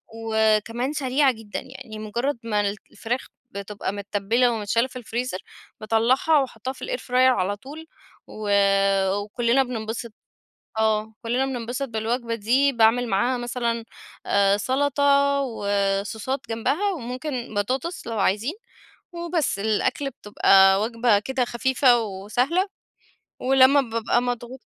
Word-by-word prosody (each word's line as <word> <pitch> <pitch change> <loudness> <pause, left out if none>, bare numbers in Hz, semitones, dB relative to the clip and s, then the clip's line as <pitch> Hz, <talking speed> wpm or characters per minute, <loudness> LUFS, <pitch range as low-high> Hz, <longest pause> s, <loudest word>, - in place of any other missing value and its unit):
وكمان 225 +3 0
سريعة 275 -1 +2
جدًا، 220 -3 -7
يعني 260 -4 -10
مجرد 235 +5 -2
ما 210 -2 0 0.3
الفراخ 240 +5 -3 0.3
بتبقى 200 0 -5
متتبلة 205 +4 +1
ومتشالة 230 +3 0
في 255 - -17
الفريزر، 240 -4 -4 0.4
باطلعها 235 +8 +3
وأحطها 260 -1 -4
في 255 - -16
ال - - -3
airfryer - - -14 0.3
على 195 +2 0
طول 295 +8 -10 0.4
و 215 -1 -6 0.7
وكلنا 235 +5 +1
بننبسط. 230 -2 -5 0.7
آه 220 0 +1
كلنا 245 +3 0
بننبسط 250 +1 -4
بالوجبة 230 +1 -2
دي، 255 +6 +2
باعمل 235 +1 +3
معاها 240 +6 +1
مثلًا 235 -1 -2 0.4
آآ 200 0 +3
سلطة 280 +3 +2
وصوصات 205 +1 -1
جنبها، 290 - 0
وممكن 250 - -5
بطاطس 255 - -2
لو 230 -2 -3
عايزين، 210 +9 +1 0.6
وبس 340 - -2
الأكل 220 +6 0
بتبقى 195 -4 +4
وجبة 230 -1 +2
كده 260 +4 -1
خفيفة 245 0 +3
وسهلة، 235 - -1 0.7
ولما 265 +2 +5
بابقى 230 -1 0
مضغو 245 +1 -4
235 Hz, 115 wpm, -24 LUFS, 215-265 Hz, 0.7 s, ولما